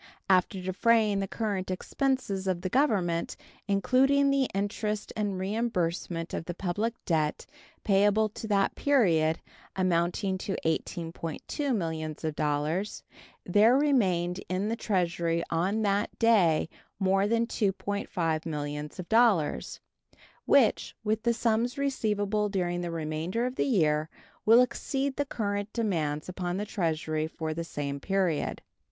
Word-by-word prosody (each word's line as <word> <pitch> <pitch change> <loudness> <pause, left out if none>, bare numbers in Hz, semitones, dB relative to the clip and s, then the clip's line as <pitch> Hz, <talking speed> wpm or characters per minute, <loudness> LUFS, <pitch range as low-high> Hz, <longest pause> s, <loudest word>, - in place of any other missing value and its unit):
After 185 +1 +3
defraying 205 +3 +2
the 195 - -2
current 200 -3 -2
expenses 200 -1 -1
of 180 -2 0
the 185 0 -3
Government, 190 - +1 0.3
including 270 +7 +3
the 275 -2 +2
Interest 210 +1 -2
and 205 -3 -1
reimbursement 185 -5 -2
of - - -3
the 175 - -5
public 205 +6 -2
debt 155 -3 0 0.4
payable 205 +1 +3
to 220 - -7
that 200 -2 +2
period, 170 - +2 0.3
amounting 185 +1 0
to 195 - -3
$18.2 165 - -2
millions, 160 -4 -3 1.2
there 215 +7 +5
remained 190 -11 +1
in 185 +3 -1
the 230 - 0
Treasury 170 -6 0
on 190 +7 +1
that 205 +1 0
day 200 -11 +4 0.3
more 195 +1 +2
than 230 +1 +2
$2.5 195 -6 -1
millions, 155 +6 0 0.7
which, 275 -6 +3
with 215 0 0
the 235 +1 +2
sums 235 +3 0
receivable 210 -6 0
during 175 -3 -1
the 175 - -3
remainder 165 +7 -2
of 255 0 -3
the - - 0
year, 155 - +2 0.4
will 230 +3 +8
exceed 270 +2 -2
the 285 - -1
current 205 -4 -3
demands 160 -10 -1
upon 180 0 -3
the 205 - -2
Treasury 160 -6 -1
for 160 -1 -4
the 170 +2 -3
same 140 -3 -4
period. 185 -2 -1
195 Hz, 125 wpm, -28 LUFS, 170-220 Hz, 1.2 s, will